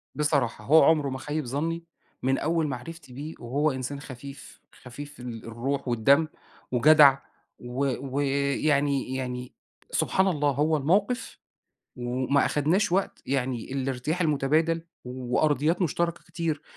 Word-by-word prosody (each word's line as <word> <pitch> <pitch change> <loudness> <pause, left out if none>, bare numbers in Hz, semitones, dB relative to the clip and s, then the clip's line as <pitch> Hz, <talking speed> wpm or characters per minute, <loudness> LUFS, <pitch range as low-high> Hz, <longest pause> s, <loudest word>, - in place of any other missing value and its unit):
بصراحة، 140 -8 0
هو 155 +5 +7
عُمره 150 -4 +4
ما 130 - -4
خَيِّب 150 +1 -3
ظَنّي 165 +6 -2 0.4
من 135 +1 +2
أول 160 0 0
معرفتي 140 +2 -7
بيه 150 +5 -7
وهو 140 +5 0
إنسان 130 +2 -4
خفيف، 135 0 -10 0.2
خفيف 145 +4 -9
في - - -14
الروح 120 +3 -4
والدم 135 +7 +4 0.4
وجدع 140 +2 +7 0.4
و 125 +3 -2 0.3
و - - +2 0.4
يعني 140 -3 +1
يعني 125 -1 -4 0.4
سبحان 190 +1 +2
الله 150 -5 +1
هو 150 +3 +1
الموقف 200 - 0 0.6
وما 125 +3 +1
أخدناش 165 +6 +1
وقت، 195 +1 0
يعني 130 -2 -2
الارتياح 135 +5 -2
المُتَبادل 160 +2 +2 0.2
وأرضيات 145 +7 0
مشتركة 170 +1 -1
كتير 165 -3 -3
140 Hz, 125 wpm, -27 LUFS, 130-155 Hz, 0.6 s, هو